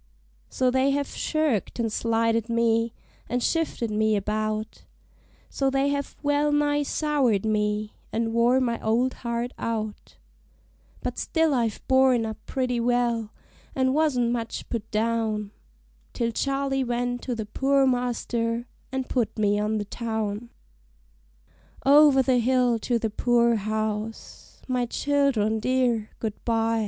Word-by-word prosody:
So 255 Hz, -1 st, +1 dB
they 260 Hz, +2 st, +2 dB
have 280 Hz, 0 st, 0 dB
shirked 305 Hz, -, -1 dB
and 225 Hz, -2 st, -1 dB
slighted 230 Hz, 0 st, +1 dB
me, 230 Hz, 0 st, +2 dB, 0.4 s
an' 245 Hz, +2 st, 0 dB
shifted 300 Hz, -7 st, -1 dB
me 215 Hz, 0 st, +2 dB
about 215 Hz, +1 st, -2 dB, 0.6 s
So 270 Hz, -1 st, 0 dB
they 270 Hz, +1 st, +1 dB
have 280 Hz, -1 st, -3 dB
well 290 Hz, +1 st, +2 dB
nigh 290 Hz, 0 st, +2 dB
soured 280 Hz, -8 st, +1 dB
me, 210 Hz, 0 st, 0 dB, 0.2 s
an' 225 Hz, 0 st, -1 dB
wore 240 Hz, +3 st, +4 dB
my 235 Hz, -3 st, -1 dB
old 240 Hz, +4 st, +1 dB
heart 235 Hz, 0 st, -3 dB
out; 215 Hz, -2 st, -4 dB, 0.9 s
But -, -, -3 dB
still 320 Hz, -2 st, +1 dB
I've 230 Hz, -5 st, -1 dB
borne 260 Hz, -3 st, +4 dB
up 220 Hz, -1 st, -6 dB
pretty 250 Hz, -2 st, -1 dB
well, 235 Hz, -2 st, 0 dB, 0.4 s
an' 260 Hz, 0 st, +2 dB
wasn't 270 Hz, -6 st, +2 dB
much 230 Hz, -2 st, -4 dB
put 225 Hz, -2 st, -4 dB
down, 220 Hz, -2 st, -1 dB, 0.6 s
Till 235 Hz, -2 st, -1 dB
Charley 275 Hz, +1 st, 0 dB
went 245 Hz, 0 st, -2 dB
to 250 Hz, -, -3 dB
the 220 Hz, -2 st, -4 dB
poor 270 Hz, +5 st, +2 dB
master, 240 Hz, -2 st, -1 dB, 0.3 s
an' 265 Hz, 0 st, -1 dB
put 245 Hz, -3 st, -2 dB
me 205 Hz, -1 st, +2 dB
on 215 Hz, +1 st, 0 dB
the 205 Hz, -, -3 dB
town. 220 Hz, 0 st, -3 dB, 1.4 s
Over 280 Hz, -1 st, +7 dB
the 255 Hz, -1 st, +3 dB
hill 245 Hz, -1 st, +2 dB
to 240 Hz, +2 st, 0 dB
the 225 Hz, -2 st, -2 dB
poor 235 Hz, +1 st, +3 dB
house 215 Hz, +1 st, -4 dB
my 250 Hz, -2 st, 0 dB
child'rn 255 Hz, -6 st, +1 dB
dear, 240 Hz, -2 st, +1 dB
good 215 Hz, -2 st, -5 dB
by! 225 Hz, -1 st, +1 dB
235 Hz, 135 wpm, -25 LUFS, 220-260 Hz, 1.4 s, Over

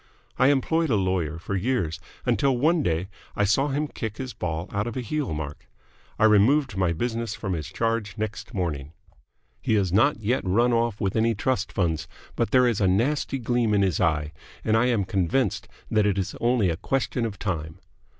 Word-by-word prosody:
I 130 Hz, -, +6 dB
employed 160 Hz, +4 st, +2 dB
a 115 Hz, -, +3 dB
lawyer 95 Hz, -5 st, 0 dB
for 95 Hz, +4 st, -4 dB
years, 95 Hz, -7 st, -1 dB, 0.3 s
until 125 Hz, +2 st, +2 dB
one 160 Hz, +6 st, +3 dB
day 85 Hz, -, 0 dB, 0.3 s
I 105 Hz, -, +2 dB
saw 110 Hz, +8 st, +2 dB
him 145 Hz, +2 st, -1 dB
kick 110 Hz, -6 st, -5 dB
his 130 Hz, -2 st, -5 dB
ball 85 Hz, 0 st, -3 dB
out 100 Hz, +3 st, -1 dB
of 120 Hz, -, -5 dB
a -, -, -1 dB
heel 145 Hz, -, -2 dB
mark. 75 Hz, -2 st, -5 dB, 0.5 s
I -, -, +1 dB
removed 120 Hz, +5 st, +4 dB
my 95 Hz, -3 st, +1 dB
business 115 Hz, +4 st, -2 dB
from 105 Hz, -4 st, -3 dB
his 80 Hz, -4 st, -4 dB
charge 110 Hz, +3 st, -2 dB
next 110 Hz, 0 st, -4 dB
morning. 80 Hz, -, -3 dB, 0.7 s
He 110 Hz, -, +1 dB
has 95 Hz, -4 st, +1 dB
not 120 Hz, +6 st, +4 dB
yet 115 Hz, +4 st, 0 dB
run 115 Hz, +6 st, +2 dB
off 115 Hz, -2 st, +1 dB
with 95 Hz, -2 st, -1 dB
any 115 Hz, 0 st, +2 dB
trust 110 Hz, 0 st, -1 dB
funds, 80 Hz, -5 st, -1 dB, 0.3 s
but -, -, 0 dB
there 125 Hz, +2 st, +5 dB
is 115 Hz, -4 st, +1 dB
a 95 Hz, -, +4 dB
nasty 130 Hz, +9 st, +1 dB
gleam 120 Hz, -3 st, +1 dB
in 100 Hz, -, +3 dB
his 95 Hz, -5 st, +1 dB
eye, 75 Hz, -3 st, +1 dB, 0.3 s
and 110 Hz, -, +2 dB
I 120 Hz, +2 st, +3 dB
am 115 Hz, -6 st, +1 dB
convinced 95 Hz, +4 st, 0 dB, 0.2 s
that 105 Hz, -1 st, +3 dB
it 100 Hz, -1 st, +1 dB
is 95 Hz, -, -2 dB
only 115 Hz, -6 st, +2 dB
a 80 Hz, -, -3 dB
question 125 Hz, +3 st, -1 dB
of 110 Hz, -3 st, -3 dB
time. 80 Hz, -6 st, -3 dB
105 Hz, 200 wpm, -25 LUFS, 90-125 Hz, 0.7 s, I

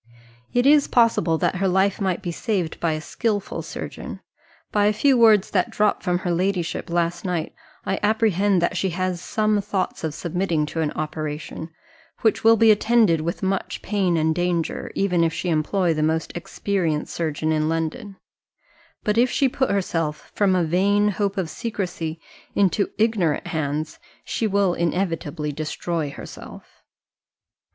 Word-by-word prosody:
"It 245 Hz, +1 st, +2 dB
is 290 Hz, 0 st, +6 dB
possible 215 Hz, -8 st, +3 dB
that 185 Hz, -, 0 dB
her 195 Hz, +1 st, +1 dB
life 190 Hz, +3 st, +2 dB
might 190 Hz, -3 st, -1 dB
be 175 Hz, -, -2 dB
saved 180 Hz, -3 st, -2 dB
by 165 Hz, -2 st, +1 dB
a 155 Hz, -, -3 dB
skilful 205 Hz, +3 st, -2 dB
surgeon. -, -, -7 dB, 0.5 s
By 205 Hz, -1 st, +3 dB
a 210 Hz, -, +3 dB
few 270 Hz, +5 st, +3 dB
words 220 Hz, -4 st, +5 dB
that 185 Hz, -3 st, +1 dB
dropped 210 Hz, 0 st, +1 dB
from 180 Hz, -1 st, +1 dB
her 175 Hz, -, +1 dB
ladyship 175 Hz, 0 st, -1 dB
last 170 Hz, 0 st, 0 dB
night, 175 Hz, -4 st, -2 dB, 0.3 s
I 195 Hz, -, -1 dB
apprehend 205 Hz, -3 st, +2 dB
that 175 Hz, -, 0 dB
she 190 Hz, +1 st, 0 dB
has 185 Hz, -2 st, -1 dB
some 215 Hz, 0 st, +1 dB
thoughts 195 Hz, -4 st, -3 dB
of 155 Hz, -2 st, -2 dB
submitting 170 Hz, -3 st, -1 dB
to 165 Hz, -, -1 dB
an 155 Hz, -, +1 dB
operation, 155 Hz, +1 st, -5 dB, 0.5 s
which 220 Hz, -, +2 dB
will 225 Hz, 0 st, +6 dB
be 225 Hz, 0 st, +6 dB
attended 215 Hz, -6 st, +3 dB
with 170 Hz, +4 st, -3 dB
much 190 Hz, 0 st, -2 dB
pain 190 Hz, -4 st, +1 dB
and 160 Hz, 0 st, +2 dB
danger, 175 Hz, -1 st, -1 dB
even 180 Hz, -4 st, +2 dB
if 165 Hz, 0 st, 0 dB
she 180 Hz, -, -2 dB
employ 170 Hz, +3 st, +1 dB
the 155 Hz, -, -2 dB
most 160 Hz, +1 st, 0 dB
experienced 175 Hz, -3 st, -2 dB
surgeon 155 Hz, -1 st, -1 dB
in 155 Hz, 0 st, +1 dB
London; 165 Hz, +6 st, -3 dB, 0.9 s
but 210 Hz, +2 st, +1 dB
if 250 Hz, +1 st, +4 dB
she 275 Hz, -, +2 dB
put 265 Hz, +1 st, 0 dB
herself, 165 Hz, -6 st, -2 dB
from 195 Hz, -3 st, +2 dB
a 180 Hz, -, +2 dB
vain 200 Hz, +5 st, +2 dB
hope 200 Hz, 0 st, -1 dB
of 185 Hz, -3 st, 0 dB
secrecy, 175 Hz, -6 st, -4 dB, 0.4 s
into 200 Hz, +1 st, +2 dB
ignorant 210 Hz, -9 st, +1 dB
hands, 155 Hz, 0 st, -3 dB, 0.2 s
she 225 Hz, -, -1 dB
will 200 Hz, -3 st, +2 dB
inevitably 165 Hz, -4 st, -2 dB
destroy 155 Hz, +1 st, -3 dB
herself." -, -, -11 dB
180 Hz, 160 wpm, -23 LUFS, 165-205 Hz, 0.9 s, is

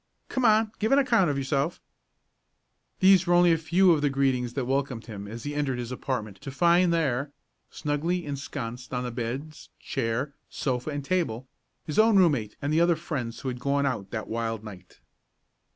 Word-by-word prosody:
"Come 260 Hz, -, -1 dB
on; 220 Hz, 0 st, +4 dB
give 220 Hz, +1 st, 0 dB
an 275 Hz, -, +6 dB
account 235 Hz, -, +3 dB
of 140 Hz, -, -1 dB
yourself." 140 Hz, +4 st, -1 dB, 1.2 s
These 190 Hz, -1 st, +6 dB
were 175 Hz, -, +4 dB
only 175 Hz, 0 st, +6 dB
a 165 Hz, -, +4 dB
few 175 Hz, +3 st, +4 dB
of 155 Hz, -3 st, +3 dB
the 145 Hz, -, +2 dB
greetings 130 Hz, -3 st, 0 dB
that 135 Hz, -2 st, -2 dB
welcomed 135 Hz, -3 st, -1 dB
him 100 Hz, -3 st, -8 dB
as 115 Hz, +2 st, -8 dB
he 145 Hz, -, -4 dB
entered 145 Hz, -3 st, -1 dB
his 120 Hz, 0 st, -5 dB
apartment 110 Hz, -6 st, -4 dB
to -, -, -6 dB
find 170 Hz, +5 st, +3 dB
there, 140 Hz, -4 st, 0 dB, 0.4 s
snugly 165 Hz, +4 st, -2 dB
ensconced 130 Hz, -3 st, -5 dB
on 125 Hz, -, -1 dB
the 125 Hz, -, -4 dB
beds, 130 Hz, +6 st, -5 dB
chair, 125 Hz, +5 st, -2 dB, 0.2 s
sofa 125 Hz, 0 st, -2 dB
and 145 Hz, -2 st, -4 dB
table, 140 Hz, -9 st, -1 dB, 0.4 s
his 150 Hz, -, -1 dB
own 220 Hz, -1 st, +6 dB
room 180 Hz, -4 st, +6 dB
mate 110 Hz, -7 st, -3 dB
and 145 Hz, +2 st, 0 dB
the 160 Hz, -, +4 dB
other 170 Hz, 0 st, +4 dB
friends 140 Hz, -8 st, -5 dB
who -, -, -5 dB
had 125 Hz, -1 st, -5 dB
gone 140 Hz, +2 st, +1 dB
out 110 Hz, -8 st, -2 dB
that 110 Hz, 0 st, -5 dB
wild 115 Hz, -1 st, -3 dB
night. 95 Hz, -4 st, -12 dB
140 Hz, 190 wpm, -27 LUFS, 120-170 Hz, 1.2 s, an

